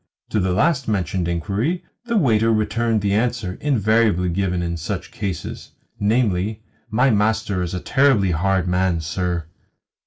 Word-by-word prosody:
To 110 - +1
the 95 -1 +1
last 140 - +1
mentioned 95 -4 -1
inquiry 105 - -1 0.2
the 235 -1 0
waiter 115 - +3
returned 110 +1 +1
the 100 0 0
answer 110 -4 -1
invariably 110 - +2
given 90 0 -1
in 85 0 -2
such 80 0 -5
cases 100 -4 -5 0.3
namely, 105 -1 0 0.3
"My 125 +4 +3
master 105 -2 +1
is 90 0 -3
a - - -2
terribly 130 -9 +3
hard 95 +2 +1
man, 90 -2 +1
sir." 85 0 -2
100 Hz, 145 wpm, -21 LUFS, 90-115 Hz, 0.3 s, waiter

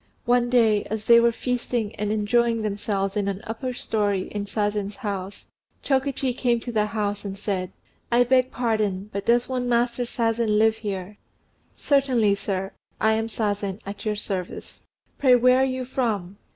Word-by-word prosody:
One 245 0 +3
day, 225 -4 +4
as 215 0 -4
they 235 0 +7
were 235 0 +4
feasting 240 -2 -2
and 210 0 -1
enjoying 230 +2 +1
themselves 200 -1 -2
in 205 -1 0
an 195 -1 -2
upper 240 +4 -4
storey 205 -5 -1
in 205 -1 -4
Sazen's 205 -1 -1
house, 200 -5 -5 0.4
Chokichi 270 -2 0
came 240 -2 +1
to 240 - -5
the 215 -2 +1
house 205 -2 -2
and 195 -1 -5
said, 190 -2 -2 0.4
"I 240 +1 +5
beg 255 +1 +3
pardon; 215 -5 -1
but 200 0 -4
does 240 +1 +3
one 250 -1 -2
Master 240 +1 +1
Sazen 230 -2 0
live 220 +1 +3
here?" 200 -1 -5 0.6
"Certainly, 260 -7 +2
sir: 195 -1 -3 0.3
I 220 0 +3
am 225 0 0
Sazen, 205 -3 -2
at 200 +1 -7
your 215 -1 -1
service. 190 -3 -5 0.4
Pray 255 -3 +6
where 250 +1 +5
are - - +4
you 255 -1 -3
from?" 210 -8 -2
220 Hz, 165 wpm, -24 LUFS, 205-245 Hz, 0.6 s, they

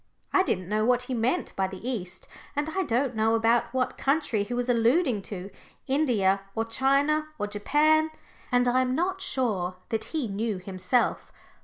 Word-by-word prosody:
I 380 - +5
didn't 185 - -1
know 215 +2 0
what 250 +2 +3
he 255 - -4
meant 250 +9 -1
by 190 0 +1
the 190 +5 -8
East, 190 -7 -4 0.3
and 290 +2 -1
I 380 - +2
don't 255 -5 0
now 220 +1 +2
know 230 +1 +3
what 255 0 -1
country 275 -6 +1
he 205 - -5
was 245 0 -1
alluding 245 - +2
to 195 0 -7 0.3
India 230 -9 +2
or 225 0 0
China 275 +6 +2
or 205 - -1
Japan. 300 +10 +2 0.4
And 245 0 +3
I 250 +1 +3
am 255 0 0
not 375 +4 -1
sure 200 - -1
that 220 -1 -2
he 310 -7 -2
knew 210 +1 -2
himself. 190 +6 -1
240 Hz, 175 wpm, -27 LUFS, 210-275 Hz, 0.4 s, I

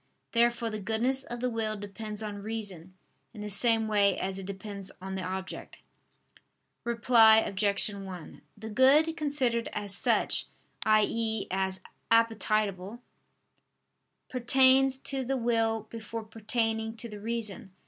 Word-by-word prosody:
Therefore 235 -1 +2
the 215 -1 -5
goodness 240 +6 0
of 240 0 -7
the 250 - 0
will 220 -2 -2
depends 210 +1 -6
on 205 -1 -5
reason, 195 -5 -6 0.4
in 210 - -8
the 210 0 -4
same 225 +1 +3
way 200 -3 +3
as 190 0 -3
it 190 - -8
depends 200 0 -7
on 190 +1 -6
the 190 - -3
object. 190 +1 -6 1.1
Reply 230 -1 +6
Obj. 200 -2 +1
1: 190 -4 -9 0.2
The 220 +1 -8
good 285 +7 +4
considered 270 -7 0
as 205 -2 -2
such, - - +2 0.4
i.e. 220 0 +2
as 190 0 -2 0.3
appetible, 215 -2 +1 1.3
pertains 260 +1 +4
to 270 0 -3
the 265 +2 -1
will 225 -2 0
before 225 0 -6
pertaining 225 0 -2
to 235 - -6
the 210 -2 -9
reason. 215 -3 -4
220 Hz, 130 wpm, -29 LUFS, 200-235 Hz, 1.3 s, Reply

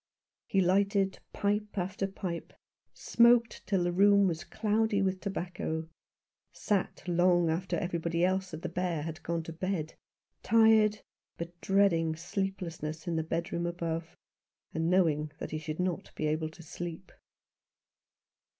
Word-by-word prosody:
He 195 - +2
lighted 195 +1 +2
pipe 210 0 -1
after 190 +1 -1
pipe, 185 -3 -5 0.4
smoked 235 -1 +3
till 195 -3 +2
the 175 - +1
room 200 +2 +5
was 165 -2 -2
cloudy 215 -1 +1
with 190 -1 0
tobacco, 175 -4 -3 0.6
sat 200 -3 -1
long 175 -1 +3
after 175 +2 -1
everybody 170 0 0
else 190 0 0
at 160 0 -7
the - - -1
Bear 175 -3 -2
had 160 0 -6
gone 170 -1 -2
to 165 - -7
bed, 170 -2 -2 0.5
tired 220 -1 +5 0.4
but 170 0 -5
dreading 170 -5 +3
sleeplessness 170 -3 -4
in 170 - 0
the 160 - +1
bedroom 170 +1 -2
above, 165 -1 -4 0.6
and 160 +1 0
knowing 155 -5 +2
that - - -6
he 155 - -2
should 155 +1 -5
not 180 -2 -2
be 155 - -2
able 155 +1 0
to 170 +2 -14
sleep. 175 +3 -7
175 Hz, 140 wpm, -30 LUFS, 165-195 Hz, 0.6 s, room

